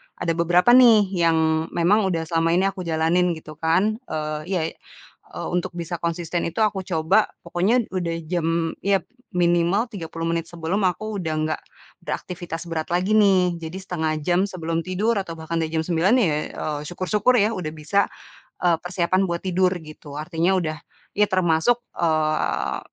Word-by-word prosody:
ada 165 - -1
beberapa 175 +6 +3
nih, 230 -6 +7
yang 160 -2 +2
memang 195 +4 +3
udah 165 -3 -1
selama 165 +1 +1
ini 185 - +3
aku 185 -3 -7
jalanin 165 +2 +2
gitu 155 -1 -11
kan, 190 +8 +2
eee 155 -1 -3
iya 185 -3 0 0.9
untuk 175 -1 -2
bisa 170 0 -4
konsisten 170 0 -2
itu, 170 +5 -5
aku 195 -3 0
coba 175 +5 +2 0.2
pokoknya, 190 +8 +1
udah 175 -3 -2
jam 165 -1 0
iya, 195 -1 +3 0.3
minimal 175 +5 +2
30 165 -4 -6
menit 165 0 -1
sebelum, 170 +4 -2
aku 205 +4 -3
udah 160 -3 -2
nggak 155 0 -2 0.4
beraktivitas 175 -2 -5
berat 160 -1 -2
lagi, 185 +4 +1
nih. 185 -4 +3
Jadi 165 +1 -7
1/2 160 -4 -2
jam 180 +4 +2
sebelum 165 -3 -3
tidur, 210 +4 +1
atau 170 -4 -5
bahkan 165 +1 -3
udah 160 - 0
jam 160 -1 0
9.00 175 +5 +2
ya, 220 - +3 0.3
eee, 150 -1 -3
syukur-syukur 210 +7 +1
ya, 210 +2 +2
udah 180 -8 -4
bisa, 155 +6 0 0.7
eee, 175 -2 +4
persiapan 180 +1 +1
buat 170 - -2
tidur 185 0 +2
gitu. 155 -2 -10
Artinya, 170 +4 +1
udah 155 -3 -2 0.4
ya 210 +1 +3
termasuk, 185 +5 +2 0.2
eee, 155 -2 0
175 Hz, 160 wpm, -23 LUFS, 160-190 Hz, 0.9 s, nih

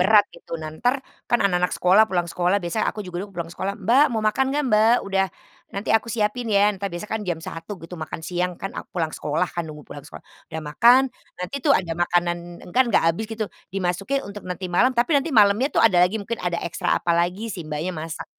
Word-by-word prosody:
berat, 205 +3 +6
gitu, 165 - -7
nah, 155 -1 -7
entar 245 - 0 0.2
kan 240 - +3
anak-anak 180 -2 +2
sekolah 185 +4 +5
pulang 175 -3 0
sekolah 180 +3 +2
biasanya 175 +5 0
aku 210 - -4
juga 180 -1 -5
dulu 200 - -6
pulang 170 -1 -4
sekolah, 195 +3 -3
"Mbak, 235 +8 +4
mau 220 -3 -2
makan 215 +5 +2
nggak, 295 +1 0
Mbak, 220 +2 +5
udah 195 -1 +1 0.5
nanti 200 - -4
aku 225 +1 +2
siapin 230 +1 -1
ya," 205 0 +4
entar 200 0 -4
biasanya 175 +4 -6
kan 220 - -1
jam 170 -2 -1
1:00 165 +5 -7
gitu 165 0 -13
makan 155 - -5
siang 180 +1 -2
kan 195 - -6
aku - - -7
pulang 160 -3 0
sekolah 150 +4 -1
kan, 170 -2 -4
nunggu 150 -1 -10
pulang 145 - -9
sekolah. - - -12 0.2
Udah 160 -1 -5
makan, 235 - +5 0.3
nanti 180 +11 -5
tuh 285 +1 +4
ada 170 -3 -2
makanan 175 +1 +1 0.4
kan 260 - +5
nggak 225 - +3
habis 220 +7 -4
gitu, 225 -1 -3 0.2
dimasukin 195 +8 -2
untuk 200 -2 -9
nanti 180 0 -5
malam, 255 +8 +3
tapi 240 +7 +2
nanti 285 +2 +2
malamnya 220 0 +4
tuh - - +1
ada 190 -6 +5
lagi 180 +4 +3
mungkin 220 +2 -4
ada 175 -1 -1
ekstra 170 - 0
apalagi, 175 +6 0
si 170 -5 -7
mbaknya 155 +4 -3
masak. 160 -2 -6
190 Hz, 220 wpm, -23 LUFS, 175-220 Hz, 0.5 s, berat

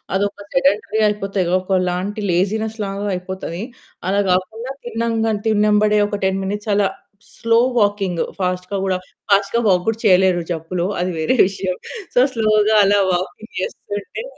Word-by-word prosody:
అదొక 200 +1 -1
సెడంటరీ 200 +4 +2
అయిపోతది, 195 -3 -1
ఒకలాంటి 185 +2 -1
లేజినెస్ 215 +5 0
లాగా 200 +1 -4
అయిపోతది. 180 0 -5 0.5
అలా 200 +1 +2
గాకుండా 220 +7 -1
తిన్నంగ 230 -1 -1 0.2
తిన్నంబడే 210 0 +3
ఒక 205 -1 -3
10 190 0 0
మినిట్స్ 205 +2 -3
అలా 200 -1 +3 0.5
స్లో 230 0 +3 0.2
వాకింగ్ 200 -4 +1 0.2
ఫాస్ట్‌గా 185 +1 -2
గూడా 185 -1 0 0.3
ఫాస్ట్‌గా 200 +3 +3
వాక్ 180 -1 +3
గూడా 225 0 0
చేయలేరు 185 -2 +4
జబ్బులో 170 +2 -3
అది 180 +1 0
వేరే 160 +11 +1
విషయం. 190 -2 -3 0.4
సో, - - +3 0.2
స్లో‌గా 215 -1 +3
అలా 200 +1 +4
వాకింగ్ 185 +5 -4
చేస్తుంటే 205 - -5
200 Hz, 135 wpm, -19 LUFS, 185-215 Hz, 0.5 s, చేయలేరు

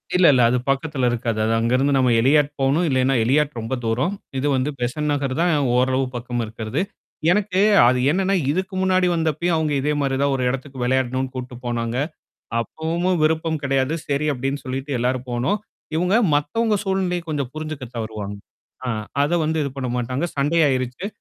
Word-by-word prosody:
இல்ல, 180 0 +5
இல்ல. 125 - +4
அது 125 - +2
பக்கத்துல 135 -1 0
இருக்காது. 115 -2 -2
அது 110 - +1
அங்கருந்து 130 +5 +2
நம்ம 130 -1 +3
எளியாட் 145 +3 +4
போணும். 140 +6 +2
இல்லன்னா, 130 0 +2
எளியாட் 140 +3 +1
ரொம்ப 115 +4 -3
தூரம். 125 - 0 0.2
இது 140 +3 0
வந்து 130 +3 0
பெசன்ட் 150 +5 -1
நகர் 135 -2 -1
தான் 175 0 +3 0.3
ஓரளவு 130 +1 +2
பக்கம் 120 0 -3
இருக்கிறது. 110 +5 -3 0.5
எனக்கு, 195 -1 +1 0.3
அது 125 0 +3
என்னன்னா 195 +3 +1 0.2
இதுக்கு 185 +4 -2
முன்னாடி 185 -1 +3
வந்தப்பயும் 165 +1 0
அவுங்க 155 -2 0
இதே 150 +2 0
மாரி 135 -2 0
தான் 140 0 +2
ஒரு 130 - -1
இடத்துக்கு 135 +1 -5
விளையாடணும்னு 130 +1 0
கூட்டிட்டு 125 -1 -6
போனாங்க. 120 0 -2 0.6
அப்பவும்மும் 170 +7 -1
விருப்பம் 160 0 +1
கிடையாது. 135 +2 +1
சரி 145 +2 0
அப்டின்னு 135 +1 -3
சொல்லிட்டு, 135 +2 -4
எல்லாரும் 125 +1 -1
போனோம். 125 - 0 0.4
இவங்க 180 +4 +1 0.2
மத்தவங்க 215 +10 +1
சூழ்நிலைய 190 -2 0
கொஞ்சம் 140 -5 -2
புரிஞ்சுக்க 155 -3 -5
தவறுவாங்க. 110 -3 -5 0.5
ஆ - - -1 0.3
அத 145 +4 0
வந்து 160 +1 0
இது 140 - -2
பண்ண 130 -2 -3
மாட்டாங்க. 125 +5 -2
சண்டையாயிருச்சு. 140 0 +1
135 Hz, 165 wpm, -22 LUFS, 125-160 Hz, 0.6 s, இல்ல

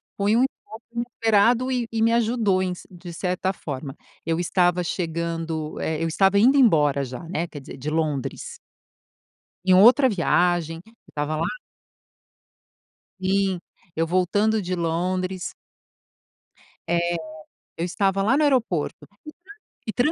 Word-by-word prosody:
foi 205 +2 +2
um 240 - +4
encontro 225 -4 -6
inesperado 235 +1 +2
e 245 -2 -1
e 225 -1 -1
me 230 +1 +4
ajudou 225 -5 +2
em 180 -1 -1
c - - -14
de 175 -1 -10
certa 180 +2 -1
forma. 140 -5 -6 0.3
Eu 165 0 0
estava 180 0 +2
chegando 165 -2 -3
eh, 160 0 -2
eu - - +1
estava 195 +4 +3
indo 255 +7 +5
embora 150 - +4
já, 125 +3 -7
né, 170 0 -3
quer 150 - -9
dizer, 135 - -10
de 140 +3 -4
Londres. 155 -4 -2 1.1
Em 185 - +5
outra 245 +8 +7
viagem, 175 -4 +1
eu 225 - -20 0.2
estava 150 +1 -2
lá 155 - -1 1.7
Sim. 190 -1 +1 0.4
Eu 165 - +1
voltando 205 +5 +1
de 185 -1 -3
Londres 180 +2 -2 1.4
eh, 170 0 +1 0.6
eu 165 - -2
estava 195 +1 0
lá 225 +7 +3
no 305 - +3
aeroporto 240 - 0 0.8
e 220 - -2
tran 255 +5 +2
185 Hz, 135 wpm, -24 LUFS, 165-220 Hz, 1.7 s, outra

